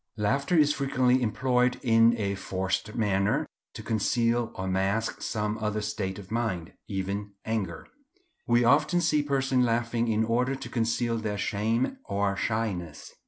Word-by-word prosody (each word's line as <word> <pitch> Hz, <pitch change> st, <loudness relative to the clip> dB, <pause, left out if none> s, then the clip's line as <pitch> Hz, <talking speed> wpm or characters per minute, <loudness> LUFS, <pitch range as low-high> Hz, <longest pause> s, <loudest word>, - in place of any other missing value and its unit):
Laughter 140 Hz, -, +1 dB
is 150 Hz, -1 st, +5 dB
frequently 130 Hz, -2 st, +2 dB
employed 125 Hz, +2 st, +1 dB
in 115 Hz, 0 st, +5 dB
a 100 Hz, -2 st, 0 dB
forced 95 Hz, +2 st, -3 dB
manner 100 Hz, -3 st, +1 dB, 0.3 s
to -, -, -7 dB
conceal 115 Hz, +2 st, +1 dB
or 95 Hz, -, -4 dB
mask 95 Hz, +4 st, 0 dB
some 105 Hz, 0 st, -2 dB
other 105 Hz, -1 st, -1 dB
state 95 Hz, -3 st, -3 dB
of 100 Hz, -1 st, -11 dB
mind, 110 Hz, -8 st, -2 dB
even 100 Hz, +1 st, -3 dB
anger. 100 Hz, -7 st, -3 dB, 0.6 s
We 120 Hz, 0 st, +4 dB
often 150 Hz, +8 st, +4 dB
see 155 Hz, -3 st, +2 dB
persons 135 Hz, -3 st, +1 dB
laughing 115 Hz, 0 st, 0 dB
in 110 Hz, 0 st, +2 dB
order 125 Hz, +4 st, +1 dB
to -, -, -8 dB
conceal 115 Hz, 0 st, 0 dB
their 105 Hz, -2 st, -3 dB
shame 115 Hz, -, -1 dB
or 100 Hz, 0 st, 0 dB
shyness. 100 Hz, -9 st, -3 dB
115 Hz, 145 wpm, -27 LUFS, 100-125 Hz, 0.6 s, is